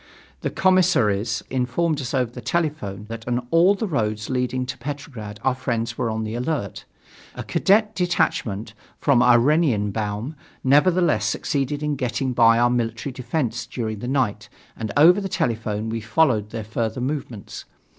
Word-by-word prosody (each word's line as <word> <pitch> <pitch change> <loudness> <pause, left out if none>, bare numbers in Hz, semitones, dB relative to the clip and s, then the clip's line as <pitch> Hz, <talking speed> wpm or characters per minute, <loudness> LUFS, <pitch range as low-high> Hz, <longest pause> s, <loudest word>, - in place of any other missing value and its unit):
The - - -2
commissaries 115 - +2
informed 130 +5 0
us 125 - -4
over 125 -3 0
the 125 - -9
telephone 145 - -2
that 115 +1 -8
on 120 0 -1
all 175 +5 +5
the 210 - -2
roads 110 - -2
leading 125 0 -1
to 130 0 -6
Petrograd 125 -6 -7
our 130 - +3
friends 120 -3 -2
were 115 - -1
on 110 0 -2
the 110 0 -4
alert. 120 - -3 0.5
A - - -5
cadet 210 +2 +2
detachment 115 - -1 0.2
from 140 -5 +3
Oranienbaum 120 - +2 0.3
nevertheless 145 - +3
succeeded 140 +5 -1
in 150 -1 0
getting 130 0 -1
by 115 -1 +5
our 120 +1 +3
military 120 +2 -2
defence 125 -1 -2
during 110 -4 -4
the 120 - -5
night 105 -6 -1 0.3
and 110 -2 -4
over 175 +7 +7
the 195 - -4
telephone 110 - -1
we 115 0 -3
followed 110 -3 +2
their 110 0 -5
further 110 +2 -3
movements. 125 -6 -5
125 Hz, 155 wpm, -23 LUFS, 110-145 Hz, 0.5 s, over